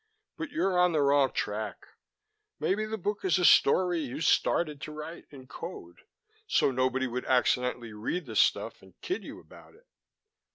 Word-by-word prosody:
But 325 Hz, -, -5 dB
you're 195 Hz, -, 0 dB
on 180 Hz, -1 st, +4 dB
the 155 Hz, -, +2 dB
wrong 140 Hz, -1 st, +3 dB
track. 105 Hz, 0 st, -4 dB, 0.7 s
Maybe 195 Hz, +8 st, 0 dB
the 220 Hz, +1 st, -4 dB
book 205 Hz, +1 st, -3 dB
is 185 Hz, 0 st, +2 dB
a 180 Hz, -, +2 dB
story 175 Hz, +4 st, +5 dB
you 135 Hz, -4 st, -5 dB
started 155 Hz, -2 st, +1 dB
to 155 Hz, -, -6 dB
write 155 Hz, +3 st, -8 dB
in 135 Hz, -3 st, -13 dB
code, 130 Hz, -, -9 dB, 0.5 s
so -, -, +2 dB
nobody 130 Hz, +1 st, 0 dB
would 125 Hz, 0 st, -4 dB
accidentally 125 Hz, -2 st, +1 dB
read 120 Hz, +11 st, -3 dB
the 110 Hz, -3 st, -8 dB
stuff -, -, +1 dB
and 95 Hz, 0 st, -20 dB
kid 370 Hz, -, -3 dB
you -, -, -9 dB
about -, -, -17 dB
it." 470 Hz, +3 st, -24 dB
150 Hz, 170 wpm, -29 LUFS, 125-180 Hz, 0.7 s, story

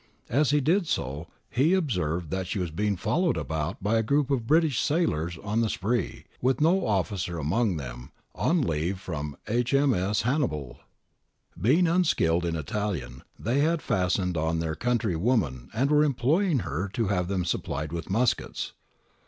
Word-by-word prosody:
As 145 Hz, +3 st, +3 dB
he 145 Hz, +1 st, +4 dB
did 170 Hz, +6 st, +2 dB
so, 70 Hz, -, -2 dB, 0.2 s
he 150 Hz, +9 st, +3 dB
observed 90 Hz, -, -1 dB
that 95 Hz, -1 st, -2 dB
she 100 Hz, -, -3 dB
was 90 Hz, -4 st, -2 dB
being 105 Hz, +4 st, 0 dB
followed 175 Hz, -, +1 dB
about 80 Hz, -, -3 dB
by 110 Hz, +3 st, +2 dB
a -, -, +3 dB
group 140 Hz, +5 st, +1 dB
of 120 Hz, -5 st, 0 dB
British 155 Hz, -4 st, +3 dB
sailors 90 Hz, -, 0 dB
on 105 Hz, +2 st, 0 dB
the 115 Hz, -, +1 dB
spree, 115 Hz, +5 st, -2 dB, 0.2 s
with 130 Hz, 0 st, +2 dB
no 175 Hz, +5 st, +3 dB
officer 95 Hz, -4 st, -1 dB
among 90 Hz, +5 st, +1 dB
them, -, -, -8 dB, 0.2 s
on 165 Hz, -2 st, +1 dB
leave 85 Hz, +1 st, -1 dB
from 75 Hz, -6 st, -5 dB
H.M.S. 120 Hz, -4 st, +2 dB
Hannibal} 80 Hz, -, -1 dB, 0.8 s
Being 160 Hz, -, +3 dB
unskilled 120 Hz, -, +2 dB
in 85 Hz, -1 st, -1 dB
Italian, 80 Hz, -6 st, -3 dB, 0.2 s
they 120 Hz, +5 st, 0 dB
had 160 Hz, +2 st, +1 dB
fastened 90 Hz, -1 st, 0 dB
on 80 Hz, +1 st, 0 dB
their 80 Hz, -1 st, -1 dB
country 115 Hz, -1 st, 0 dB
woman 80 Hz, -, 0 dB
and 135 Hz, +6 st, 0 dB
were 150 Hz, 0 st, +5 dB
imploring 150 Hz, -, +2 dB
her 80 Hz, +5 st, -2 dB
to 115 Hz, -5 st, 0 dB
have 90 Hz, -3 st, 0 dB
them 95 Hz, -2 st, -1 dB
supplied 75 Hz, -3 st, -2 dB
with 85 Hz, +2 st, -5 dB
muskets. 115 Hz, +5 st, 0 dB
105 Hz, 160 wpm, -27 LUFS, 85-135 Hz, 0.8 s, were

